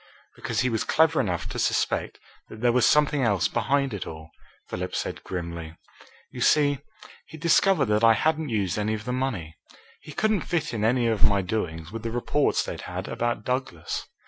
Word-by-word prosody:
"Because - - -2
he 125 - +1
was 110 - 0
clever 160 0 +3
enough 90 -4 -2
to - - -4
suspect - - 0 0.3
that 110 - -10
there 120 -1 +4
was 120 -1 +4
something 150 -1 +3
else 100 -9 +2
behind 140 -2 0
it 100 - -4
all," 80 0 -9 0.4
Philip - - -4
said - - -3
grimly. 85 -2 -6 0.5
"You - - -7
see, 145 -2 +4 0.5
he'd 160 - -11
discovered 170 0 +4
that 105 +1 +1
I 115 0 +8
hadn't 155 +4 0
used 100 -4 0
any 110 +1 0
of 105 0 -8
the 125 - -2
money. 105 -12 -3 0.4
He 155 - -11
couldn't 215 +3 +1
fit 160 -5 -2
in 110 -2 -2
any 120 +2 +2
of 110 -3 +1
my 100 -2 +3
doings 85 -5 -3
with 115 0 -5
the 115 - -3
reports 120 +5 +1
they'd - - -6
had - - -5
about 120 0 -2
Douglas. 125 -11 -3
115 Hz, 190 wpm, -26 LUFS, 100-140 Hz, 0.5 s, I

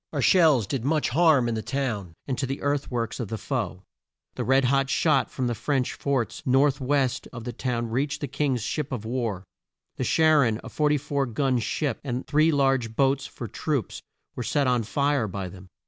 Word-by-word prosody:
Our - - -1
shells 155 - +5
did 115 +4 -3
much 150 +3 +1
harm 150 -3 +4
in 120 - -1
the 110 - -2
town, 110 -11 -3
and 135 - -2
to 135 - -1
the 135 +2 -4
earth 145 -1 0
works 120 -1 -3
of 120 - -3
the 110 - -4
foe. 110 -7 -3 0.5
The 125 - -3
red 135 +3 +3
hot 135 +1 +2
shot 135 -4 +2
from 130 - -3
the 120 - 0
French 130 +2 -1
forts 130 -7 -2
north 135 +2 +3
west 135 -1 0
of 120 -3 -8
the 120 0 -5
town 120 -1 -2
reached 140 +4 -1
the 145 - -2
King's 135 -3 -1
ships 145 +3 -3
of 110 -4 -4
war. 115 -6 -2 0.5
The - - -1
Char 155 -2 +4
on 110 -1 -1
a - - -8
44 145 -2 0
gun 130 +2 0
ship, 140 +5 -2
and 125 -2 -3
three 155 +3 +3
large 135 -6 +1
boats 135 +1 +2
for 120 - -7
troops, 140 - -3 0.3
were - - -4
set 140 +4 +1
on 125 -2 +2
fire 140 +2 0
by 95 -1 -5
them. 90 +1 -12
130 Hz, 205 wpm, -26 LUFS, 115-145 Hz, 0.5 s, shells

